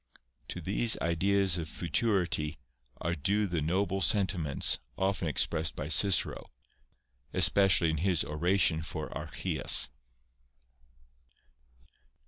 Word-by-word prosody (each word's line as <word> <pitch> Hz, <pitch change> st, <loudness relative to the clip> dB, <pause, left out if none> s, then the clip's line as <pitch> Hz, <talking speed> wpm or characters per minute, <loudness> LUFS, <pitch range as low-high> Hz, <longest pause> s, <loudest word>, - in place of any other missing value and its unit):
To -, -, -7 dB
these 115 Hz, -2 st, +2 dB
ideas 95 Hz, +2 st, 0 dB
of 80 Hz, -1 st, -7 dB
futurity 85 Hz, -6 st, -2 dB, 0.4 s
are 85 Hz, -, -2 dB
due 100 Hz, +7 st, -1 dB
the 85 Hz, -5 st, -3 dB
noble 95 Hz, +4 st, -2 dB
senti 100 Hz, -2 st, +1 dB
ments 75 Hz, -4 st, -1 dB, 0.2 s
often 95 Hz, -3 st, -2 dB
expressed 80 Hz, +2 st, -1 dB
by -, -, -6 dB
Cicero, 100 Hz, -2 st, +2 dB, 0.9 s
especially 95 Hz, -4 st, +3 dB
in 80 Hz, -, -3 dB
his 90 Hz, 0 st, 0 dB
oration 80 Hz, +1 st, 0 dB
for 80 Hz, -1 st, -8 dB
Archias. -, -, +4 dB
85 Hz, 105 wpm, -29 LUFS, 80-100 Hz, 0.9 s, Archias